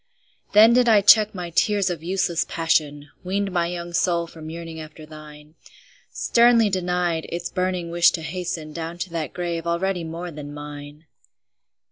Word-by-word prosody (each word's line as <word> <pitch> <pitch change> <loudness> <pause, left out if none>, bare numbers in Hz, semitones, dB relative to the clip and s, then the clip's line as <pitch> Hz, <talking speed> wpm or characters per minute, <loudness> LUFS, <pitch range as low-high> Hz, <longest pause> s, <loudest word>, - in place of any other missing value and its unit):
Then 220 +3 +7
did 245 -1 +4
I 215 -2 +6
check 210 +1 +6
my 175 -2 -6
tears 195 +2 +1
of 170 -3 -5
useless 175 -1 0
passion, 150 -3 0
Weaned 195 +2 -2
my 175 -1 0
young 175 0 -6
soul 170 -1 +1
from 160 -1 -11
yearning 165 0 -8
after 155 0 -11
thine, 150 -1 -13 0.6
Sternly 235 -3 +3
denied 180 -3 -1
its 175 0 -4
burning 180 -2 -2
wish 170 0 +5
to 165 - -4
hasten 160 -2 -5
Down 165 +1 -6
to 180 0 -5
that 165 -3 -4
grave 170 -2 -4
already 175 +1 -1
more 170 +2 -6
than 145 -1 -9
mine! 145 +1 -10
170 Hz, 160 wpm, -23 LUFS, 160-185 Hz, 0.6 s, Then